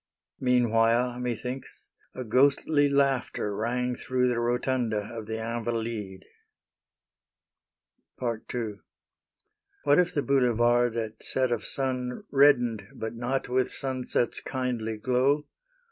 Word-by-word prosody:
Meanwhile, 120 -1 +2
methinks, 125 +2 -5 0.3
a 130 - -4
ghostly 140 +4 +3
laughter 135 -7 +1
rang 125 +3 -1
Through 125 0 0
the 120 -1 0
rotunda 120 -1 0 0.2
of 110 -2 -7
the 110 0 -3
Invalides. 115 -4 -3 2.0
II 115 -2 -3 1.0
What 145 +2 +5
if 180 -1 +3
the 145 - -1
boulevards, 120 -3 +3
at 110 -1 -4
set 130 -2 0
of 115 -3 -1
sun, 130 +4 -2
Reddened, 120 -7 +4
but 110 0 -4
not 125 +3 -2
with 130 +1 +1
sunset's 130 -3 -2
kindly 120 -4 -3
glow? 130 +6 +1
125 Hz, 105 wpm, -27 LUFS, 115-130 Hz, 2.0 s, What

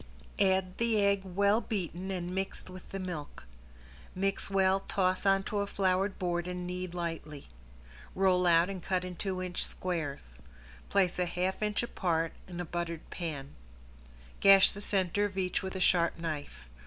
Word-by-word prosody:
Add 190 -1 +2
the 230 -2 +2
egg 200 -1 +3
well 200 +4 +2
beaten 185 -3 -3
and 180 -2 -3
mixed 190 -1 -4
with 185 0 -11
the 195 - -4
milk. 170 - -6 0.7
Mix 195 +1 -1
well, 195 -1 +3
toss 185 0 +1
onto 195 +1 +2
a 200 - 0
floured 195 0 +1
board 175 -1 -1
and 180 0 -4
knead 180 0 -4
lightly. 165 -4 -5 0.7
Roll 185 -1 +3
out 170 0 +5
and 195 -2 -5
cut 185 +1 -1
in 180 -1 -6
two 185 0 -3
inch 180 -1 -3
squares. 145 - -4 0.5
Place 185 -3 +2
a 180 - +1
half 180 +3 -1
inch 210 +1 0
apart 165 -7 0
in 180 -1 -7
a 175 - -2
buttered 170 0 -4
pan. 150 -6 -5 0.9
Gash 195 -1 +8
the 205 - -8
center 195 -1 +1
of 200 -2 -5
each 185 -2 0
with 190 0 -5
a - - -2
sharp 175 -2 +3
knife. 155 - -5
185 Hz, 165 wpm, -31 LUFS, 175-195 Hz, 0.9 s, Gash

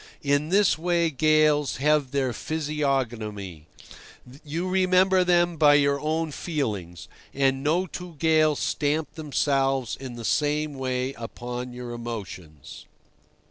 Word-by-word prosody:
In 145 +2 +1
this 195 -3 +3
way 170 -1 +1
gales 155 0 +3
have 150 0 +2
their 130 -2 -1
physiognomy. 120 - -3 0.8
You 165 +4 -3
remember 185 0 +3
them 175 -1 +2
by 145 -1 +6
your 140 -1 +3
own 155 +2 -1
feelings, 105 - -4 0.3
and 135 -1 +1
no 165 +5 +1
two 180 -1 -9
gales 155 -1 +3
stamp 150 +1 -1
themselves 135 -4 0
in 130 -2 -8
the 115 -1 -7
same 150 +2 0
way 130 0 -2
upon 125 +1 -6
your 125 0 -7
emotions. 100 - -8
145 Hz, 120 wpm, -25 LUFS, 125-160 Hz, 0.8 s, by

